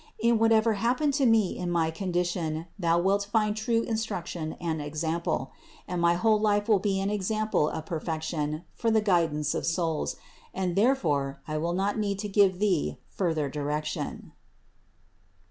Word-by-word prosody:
In 230 Hz, 0 st, +2 dB
whatever 225 Hz, 0 st, +4 dB
happened 255 Hz, +5 st, +2 dB
to 265 Hz, -, +5 dB
me 220 Hz, -5 st, +3 dB
in 180 Hz, -1 st, -3 dB
my 165 Hz, -2 st, +1 dB
condition, 175 Hz, -2 st, -2 dB
thou 170 Hz, -2 st, +2 dB
wilt 200 Hz, +3 st, +1 dB
find 215 Hz, -1 st, +2 dB
true 230 Hz, +1 st, 0 dB
instruction 180 Hz, -8 st, -3 dB
and 160 Hz, -3 st, -3 dB
example; 160 Hz, +3 st, -2 dB, 0.4 s
and 180 Hz, -1 st, -2 dB
my 170 Hz, 0 st, +4 dB
whole 215 Hz, +3 st, +3 dB
life 205 Hz, -1 st, +2 dB
will 215 Hz, -3 st, +4 dB
be 195 Hz, -1 st, 0 dB
an 195 Hz, +1 st, -1 dB
example 210 Hz, -5 st, 0 dB
of 160 Hz, -, -5 dB
perfection 160 Hz, -1 st, -3 dB
for 230 Hz, -, -1 dB
the 220 Hz, 0 st, +4 dB
guidance 165 Hz, -7 st, +1 dB
of -, -, -2 dB
souls, 160 Hz, -, -1 dB, 0.4 s
and 185 Hz, -2 st, -1 dB
therefore 150 Hz, -, +1 dB
I 155 Hz, 0 st, -2 dB
will 170 Hz, +2 st, -1 dB
not 195 Hz, +4 st, 0 dB
need 200 Hz, -2 st, -1 dB
to 210 Hz, +1 st, -4 dB
give 195 Hz, -2 st, +3 dB
thee 180 Hz, -, 0 dB
further 160 Hz, -6 st, 0 dB
direction. 150 Hz, +2 st, -4 dB
180 Hz, 160 wpm, -28 LUFS, 160-210 Hz, 0.4 s, to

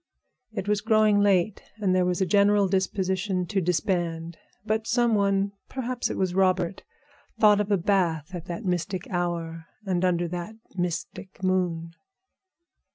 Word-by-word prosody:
It 205 Hz, -3 st, -5 dB
was 210 Hz, -1 st, +1 dB
growing 215 Hz, -2 st, +4 dB
late, 200 Hz, 0 st, +2 dB, 0.2 s
and 195 Hz, -3 st, +1 dB
there 185 Hz, -1 st, +2 dB
was 180 Hz, +1 st, 0 dB
a -, -, +3 dB
general 200 Hz, +1 st, +4 dB
disposition 190 Hz, 0 st, 0 dB
to 195 Hz, +1 st, -1 dB
disband. 170 Hz, -1 st, -1 dB, 0.3 s
But 220 Hz, +1 st, -1 dB
some 240 Hz, -1 st, +2 dB
one, 200 Hz, -1 st, +2 dB, 0.2 s
perhaps 255 Hz, -1 st, -2 dB
it -, -, -4 dB
was 185 Hz, -2 st, 0 dB
Robert, 185 Hz, -1 st, +1 dB, 0.6 s
thought 210 Hz, -1 st, +6 dB
of 205 Hz, -, -3 dB
a 200 Hz, -, +4 dB
bath 175 Hz, -3 st, 0 dB
at 175 Hz, -2 st, -6 dB
that 175 Hz, +5 st, -6 dB
mystic 180 Hz, +1 st, -2 dB
hour 170 Hz, -2 st, -3 dB, 0.2 s
and 185 Hz, -2 st, 0 dB
under 175 Hz, -1 st, +1 dB
that 175 Hz, +5 st, -5 dB, 0.2 s
mystic 180 Hz, +2 st, -4 dB
moon. 175 Hz, -3 st, 0 dB
185 Hz, 150 wpm, -26 LUFS, 175-205 Hz, 0.6 s, thought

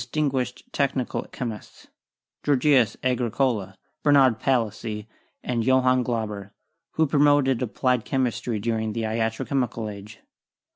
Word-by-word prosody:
76 155 Hz, -, -4 dB
CHEMISTRY 150 Hz, -2 st, +2 dB, 0.3 s
guished -, -, -37 dB
technical 135 Hz, -3 st, -1 dB
chemists 115 Hz, -5 st, -7 dB, 0.3 s
— -, -, -59 dB
Georgius 135 Hz, -4 st, +3 dB
Agricola, 120 Hz, -5 st, 0 dB, 0.2 s
Bernard 135 Hz, -6 st, +4 dB
Palissy 110 Hz, -4 st, -1 dB, 0.4 s
and 120 Hz, -2 st, -1 dB
Johann 130 Hz, 0 st, +3 dB
Glauber 105 Hz, -5 st, -3 dB, 0.2 s
— -, -, -55 dB
who 160 Hz, -, +3 dB
promoted 145 Hz, -3 st, +3 dB
applied 125 Hz, 0 st, 0 dB
chem 135 Hz, -2 st, 0 dB
istry 115 Hz, -2 st, -3 dB
during 110 Hz, 0 st, -1 dB
the 115 Hz, 0 st, -2 dB
iatro 110 Hz, +1 st, -1 dB
chemical 120 Hz, -5 st, -1 dB
age. 100 Hz, +1 st, -11 dB
125 Hz, 135 wpm, -25 LUFS, 110-135 Hz, 0.4 s, Bernard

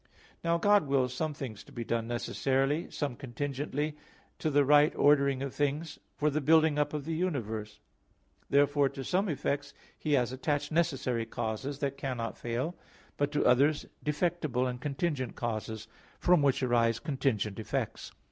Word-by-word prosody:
Now 170 Hz, 0 st, +2 dB
God 205 Hz, -2 st, +4 dB
wills 130 Hz, -2 st, +1 dB
some 155 Hz, +3 st, -2 dB
things 120 Hz, -7 st, -6 dB
to -, -, -17 dB
be 120 Hz, -, -5 dB
done 115 Hz, 0 st, -1 dB
necessarily, 135 Hz, +5 st, 0 dB
some 140 Hz, -5 st, -3 dB
contingently, 145 Hz, +4 st, -3 dB, 0.4 s
to 155 Hz, -, 0 dB
the 145 Hz, -1 st, +4 dB
right 145 Hz, +2 st, +6 dB
ordering 140 Hz, -2 st, +4 dB
of 140 Hz, -, -4 dB
things, 145 Hz, +3 st, -1 dB, 0.2 s
for 150 Hz, 0 st, +1 dB
the 155 Hz, +2 st, 0 dB
building 155 Hz, 0 st, +4 dB
up 150 Hz, -, +1 dB
of 145 Hz, -2 st, -4 dB
the 165 Hz, -, -2 dB
universe. 110 Hz, -, -3 dB, 0.7 s
Therefore 145 Hz, 0 st, +4 dB
to 135 Hz, -, -7 dB
some 190 Hz, +7 st, +1 dB
effects 145 Hz, -1 st, -2 dB, 0.2 s
He 150 Hz, -, -2 dB
has 125 Hz, -3 st, +2 dB
attached 145 Hz, +3 st, -1 dB
necessary 135 Hz, -8 st, 0 dB
causes, 120 Hz, +6 st, -3 dB
that 140 Hz, -1 st, -1 dB
cannot 125 Hz, -4 st, -3 dB
fail; 125 Hz, +9 st, -3 dB, 0.4 s
but 145 Hz, 0 st, 0 dB
to 145 Hz, -, +1 dB
others 145 Hz, +4 st, +4 dB, 0.2 s
defectible 150 Hz, -4 st, 0 dB
and 125 Hz, 0 st, -4 dB
contingent 140 Hz, -3 st, -2 dB
causes, 110 Hz, -2 st, -4 dB, 0.3 s
from 175 Hz, -3 st, +4 dB
which 140 Hz, -1 st, +2 dB
arise 115 Hz, -2 st, +3 dB
contingent 125 Hz, -, -1 dB
effects. 110 Hz, -, -3 dB
140 Hz, 155 wpm, -30 LUFS, 125-150 Hz, 0.7 s, right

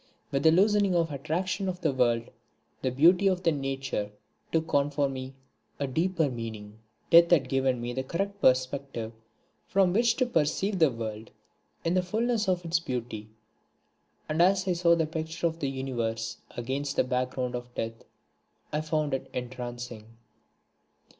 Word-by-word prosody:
With 135 Hz, -, +1 dB
the 160 Hz, -, +6 dB
loosening 200 Hz, +1 st, +4 dB
of 165 Hz, -1 st, +2 dB
the -, -, -6 dB
attraction 175 Hz, +7 st, -2 dB
of 180 Hz, 0 st, -5 dB
the 155 Hz, -5 st, +1 dB
world, 120 Hz, -2 st, +1 dB, 0.5 s
the 130 Hz, -, +1 dB
beauty 175 Hz, +9 st, +5 dB
of 185 Hz, -1 st, 0 dB
nature 135 Hz, -8 st, -1 dB, 0.4 s
took 160 Hz, 0 st, -1 dB
on 140 Hz, 0 st, +3 dB
for 145 Hz, -1 st, +1 dB
me 130 Hz, 0 st, -6 dB, 0.4 s
a 140 Hz, -, 0 dB
deeper 165 Hz, +4 st, +1 dB
meaning. 110 Hz, -4 st, -6 dB, 0.3 s
Death 170 Hz, 0 st, +8 dB
had 150 Hz, -7 st, +4 dB
given 130 Hz, -1 st, +1 dB
me 120 Hz, +1 st, -4 dB
the 130 Hz, -, -1 dB
correct 195 Hz, +9 st, -3 dB
perspective 130 Hz, -3 st, +1 dB, 0.5 s
from 195 Hz, -4 st, +3 dB
which 230 Hz, +2 st, +3 dB
to 255 Hz, -, +2 dB
perceive 190 Hz, 0 st, 0 dB
the 160 Hz, -3 st, +6 dB
world 110 Hz, -2 st, -6 dB, 0.6 s
in 165 Hz, -, +2 dB
the 185 Hz, -, +3 dB
fulness 220 Hz, +3 st, 0 dB
of 180 Hz, -1 st, 0 dB
its 165 Hz, 0 st, +2 dB
beauty, 120 Hz, -7 st, -5 dB, 1.0 s
and 155 Hz, +2 st, +1 dB
as 190 Hz, +1 st, +4 dB
I 185 Hz, -, +3 dB
saw 170 Hz, 0 st, +4 dB
the 165 Hz, -1 st, +1 dB
picture 160 Hz, +2 st, -4 dB
of 165 Hz, 0 st, 0 dB
the 140 Hz, -, -1 dB
Universe 115 Hz, -4 st, -3 dB, 0.2 s
against 135 Hz, +4 st, -2 dB
the -, -, +3 dB
background 125 Hz, 0 st, -1 dB
of 120 Hz, 0 st, -6 dB
Death 115 Hz, 0 st, -4 dB, 0.7 s
I 150 Hz, -, +1 dB
found 155 Hz, -2 st, -1 dB
it 135 Hz, -, -3 dB
entrancing. 120 Hz, -2 st, -6 dB
140 Hz, 160 wpm, -28 LUFS, 125-175 Hz, 1.0 s, Death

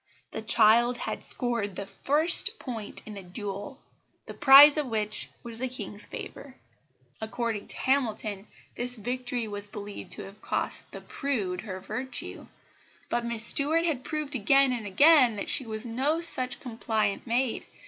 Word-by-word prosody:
The 220 Hz, -, -5 dB
child 230 Hz, +2 st, +4 dB
had -, -, -4 dB
scored 235 Hz, -6 st, -2 dB
the 200 Hz, -, -5 dB
first 315 Hz, -, +2 dB
point 230 Hz, -, -7 dB
in 215 Hz, -, -9 dB
the 200 Hz, -, -8 dB
duel, 200 Hz, +8 st, -7 dB, 0.5 s
the -, -, -9 dB
prize 285 Hz, +1 st, +8 dB
of 300 Hz, -3 st, -1 dB
which 215 Hz, -2 st, -2 dB
was 230 Hz, -1 st, -8 dB
the 260 Hz, -, -1 dB
King's 210 Hz, -4 st, -5 dB
favour. -, -, -9 dB, 0.7 s
According 220 Hz, -1 st, -3 dB
to -, -, -7 dB
Hamilton, 220 Hz, -6 st, -1 dB, 0.3 s
this 245 Hz, +1 st, +1 dB
victory 245 Hz, +1 st, -3 dB
was 205 Hz, -1 st, -4 dB
believed 205 Hz, 0 st, -9 dB
to -, -, -8 dB
have 195 Hz, +2 st, -13 dB
cost -, -, -2 dB
the -, -, -9 dB
"prude" 205 Hz, -11 st, -3 dB
her 190 Hz, -3 st, -7 dB
virtue; 255 Hz, +7 st, -6 dB, 0.6 s
but 240 Hz, 0 st, -1 dB
Miss 235 Hz, -1 st, 0 dB
Stuart 315 Hz, +7 st, +4 dB
had 290 Hz, -7 st, -2 dB
proved 305 Hz, -1 st, -4 dB
again 265 Hz, +3 st, +3 dB
and 230 Hz, -4 st, -4 dB
again 260 Hz, +3 st, +5 dB
that 200 Hz, -, -4 dB
she 260 Hz, -, -1 dB
was 220 Hz, +1 st, -1 dB
no 265 Hz, +7 st, -1 dB
such 255 Hz, -7 st, +1 dB
compliant 220 Hz, -3 st, -2 dB
maid. 240 Hz, +1 st, -1 dB
235 Hz, 160 wpm, -27 LUFS, 210-270 Hz, 0.7 s, prize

